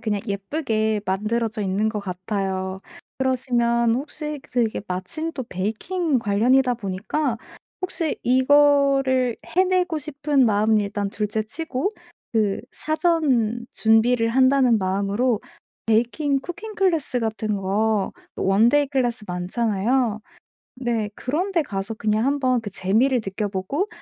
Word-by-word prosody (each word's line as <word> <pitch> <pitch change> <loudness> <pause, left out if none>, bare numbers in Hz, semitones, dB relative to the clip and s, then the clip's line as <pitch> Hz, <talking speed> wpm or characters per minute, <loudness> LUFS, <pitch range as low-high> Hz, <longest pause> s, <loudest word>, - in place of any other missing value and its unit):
그냥 215 -3 -1
예쁘게 215 0 -1
만들어져 215 +3 -1
있는 195 +3 0
것 215 -1 -3
같아요. 190 0 -3 0.4
그러시면 240 -3 +1
혹시 300 +2 -5
그게 235 -3 -1
마침 310 - -3
또 260 -5 -5
베이킹 255 - -1
관련이다 245 +5 +3
보니까 225 +5 -2 0.4
혹시 365 -4 -2
이거를 270 -1 +4
해내고 365 -2 +1
싶은 290 -2 +1
마음은 215 0 +3
일단 205 0 -2
둘째 210 +1 -2
치고 280 - -3 0.4
그 210 -4 +1
사전 285 -8 +1
준비를 230 +1 +3
한다는 260 -1 +4
마음으로 200 +5 0 0.5
베이킹 245 +6 +1
쿠킹 425 +7 -7
클래스 330 -11 +1
같은 220 -1 -2
거 200 +1 0 0.2
원데이 230 +9 +3
클래스 245 -5 -1
많잖아요. 215 +5 0 0.6
네. 235 -4 -1
그런데 340 +7 0
가서 200 -6 -4
그냥 215 +1 0
한번 265 -3 +2
그 215 - -6
재미를 225 +8 +2
느껴 205 +1 -3
보고 205 - -2
235 Hz, 265 characters per minute, -23 LUFS, 210-275 Hz, 0.6 s, 이거를